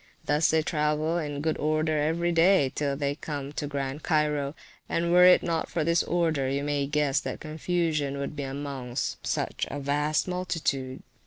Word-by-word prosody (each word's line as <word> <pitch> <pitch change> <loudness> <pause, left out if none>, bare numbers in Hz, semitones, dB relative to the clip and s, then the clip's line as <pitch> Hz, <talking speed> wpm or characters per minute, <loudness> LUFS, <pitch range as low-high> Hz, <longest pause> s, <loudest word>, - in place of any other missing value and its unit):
Thus 150 +2 +3
they 160 0 +3
travel, 155 +2 0
in 145 -3 -4
good 155 0 -1
order 155 +1 +1
every 170 +3 +1
day, 165 -4 +4
till 140 -2 -1
they 140 -1 0
come 145 -1 -6
to 150 - -3
Grand 140 0 -3
Cairo; 150 -2 0 0.3
and 170 0 0
were 180 +1 +7
it 180 - +7
not 165 -2 -1
for 165 -2 -1
this 170 +2 +3
order, 160 -6 0
you 140 +1 -1
may 145 -1 0
guess 145 -1 +1
what - - -4
confusion 155 -3 -1
would 140 +2 -4
be 145 - -4
amongst 135 -2 -4
such - - -1
a 145 - -4
vast 145 +3 0
multitude. 160 -8 -2
150 Hz, 175 wpm, -27 LUFS, 140-165 Hz, 0.3 s, were